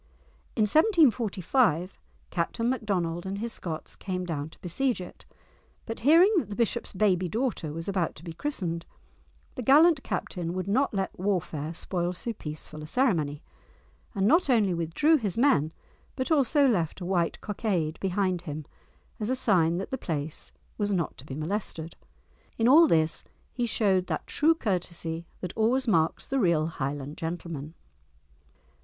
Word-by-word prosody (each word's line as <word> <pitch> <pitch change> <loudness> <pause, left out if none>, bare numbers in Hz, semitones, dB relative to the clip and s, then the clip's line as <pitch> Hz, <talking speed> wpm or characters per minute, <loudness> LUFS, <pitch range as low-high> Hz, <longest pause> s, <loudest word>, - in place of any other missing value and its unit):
In 220 - +3
1745 230 - +3 0.3
Captain 230 +7 -1
Macdonald 190 -8 -1
and 195 +1 -3
his 230 +2 -3
Scots 160 -3 -6
came 185 -2 -4
down 155 -3 -3
to - - -18
besiege 240 +8 -1
it, 180 - -10 0.6
but 225 - -5
hearing 335 - +6
that 225 - -5
the 205 - -5
bishop's 235 +1 -1
baby 185 -3 +1
daughter 220 - -2
was 165 +2 -6
about 190 -4 -1
to 150 - -13
be 170 -2 -7
christened, 170 - -3 0.7
the 255 - -5
gallant 295 +5 +6
captain 175 -5 -3
would 185 +1 -3
not 260 +8 +2
let 195 -2 -2
warfare 170 -5 -2
spoil 175 0 -2
so 230 +6 -4
peaceful 155 -4 -7
a 155 - -7
ceremony, 165 - +1 0.7
and 195 -1 +1
not 315 - +4
only 215 -7 +3
withdrew 170 - +2
his 210 - -3
men, 160 - +3 0.4
but 260 +3 -2
also 285 -1 +4
left 175 - 0
a 180 - -5
white 175 -2 0
cockade 190 -7 -2
behind 185 -2 0
him 155 -3 -6 0.5
as 215 +1 -2
a 260 - +2
sign 175 -9 +3
that 195 - -5
the 265 - -2
place 155 -5 -3 0.3
was 205 0 +1
not 175 -5 -1
to 135 - -13
be 135 - -6
molested. 165 0 -3 0.6
In 230 - +3
all 320 +6 +8
this 160 - +2 0.3
he 245 -2 -1
showed 190 -5 +2
that - - -3
true 320 +2 +3
courtesy 170 - -3
that 180 - -4
always 245 +4 +2
marks 165 -6 +2
the 270 - -1
real 170 -7 +3
Highland 145 -1 -4
gentleman. 165 -2 -5
185 Hz, 160 wpm, -28 LUFS, 165-235 Hz, 0.7 s, all